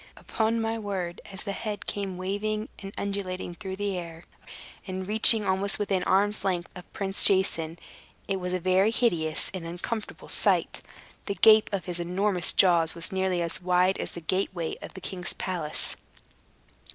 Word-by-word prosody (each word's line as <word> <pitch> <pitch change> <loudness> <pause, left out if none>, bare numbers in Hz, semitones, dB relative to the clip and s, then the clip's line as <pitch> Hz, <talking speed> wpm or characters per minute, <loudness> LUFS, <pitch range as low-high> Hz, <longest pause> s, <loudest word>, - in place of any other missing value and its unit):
Upon 225 +1 -1
my 225 0 -1
word, 190 -5 -4
as 190 - -7
the 200 - -3
head 205 0 -5
came 195 -3 -4
waving 210 +3 -3
and 195 -1 -8
undulating 190 -3 -4
through 190 +1 -6
the 200 -2 -2
air, 165 -1 -9 0.6
and 185 0 -5
reaching 220 0 +8
almost 190 +1 +1
within 195 -3 -1
arm's 205 +2 +3
length 180 -3 -1
of 180 -1 -12
Prince 195 -1 -3
Jason, 170 -4 +4 0.5
it 195 - -1
was 180 0 -4
a 185 - -1
very 185 +3 +3
hideous 170 -10 0
and 185 -3 -5
uncomfortable 180 +6 -6
sight. - - +1 0.5
The 200 - -2
gape 220 0 +6
of 195 -4 -3
his 175 -1 -3
enormous 180 +1 +1
jaws 170 -3 +4
was 170 0 -5
nearly 190 -2 0
as 170 +2 -4
wide 180 +1 +2
as - - -3
the 170 - -7
gateway 175 -1 -2
of - - -10
the 190 - -9
king's 180 -1 -5
palace. 170 -5 -4
190 Hz, 165 wpm, -27 LUFS, 180-200 Hz, 0.6 s, reaching